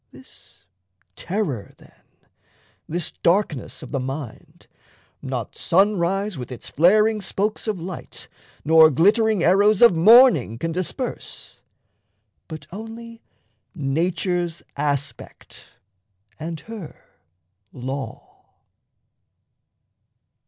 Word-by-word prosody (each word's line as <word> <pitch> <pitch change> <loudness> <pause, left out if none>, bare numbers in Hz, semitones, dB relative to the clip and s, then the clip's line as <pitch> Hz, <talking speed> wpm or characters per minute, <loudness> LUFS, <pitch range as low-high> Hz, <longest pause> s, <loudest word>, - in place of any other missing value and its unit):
This - - -16 0.5
terror 170 - -4
then, - - -21 0.9
this 170 +1 -1
darkness 170 -6 -1
of - - -10
the 140 - -1
mind, 135 -2 -7 0.6
Not 125 -4 -5
sunrise 195 -1 +1
with 125 - -7
its 125 - -7
flaring 210 +7 +3
spokes 210 +3 -2
of 215 -3 -1
light, 175 +2 -8 0.4
Nor 160 0 +7
glittering 205 - +3
arrows 200 +4 +4
of 235 - +8
morning 175 - +6
can 165 +7 -3
disperse, 185 +9 -5 0.9
But 155 -3 -9
only 225 +3 -9 0.5
nature's 170 +3 -1
aspect 140 -3 -5 0.7
and 160 0 -5
her 220 -9 -10 0.7
law. 130 +2 -7
175 Hz, 90 wpm, -22 LUFS, 145-210 Hz, 0.9 s, of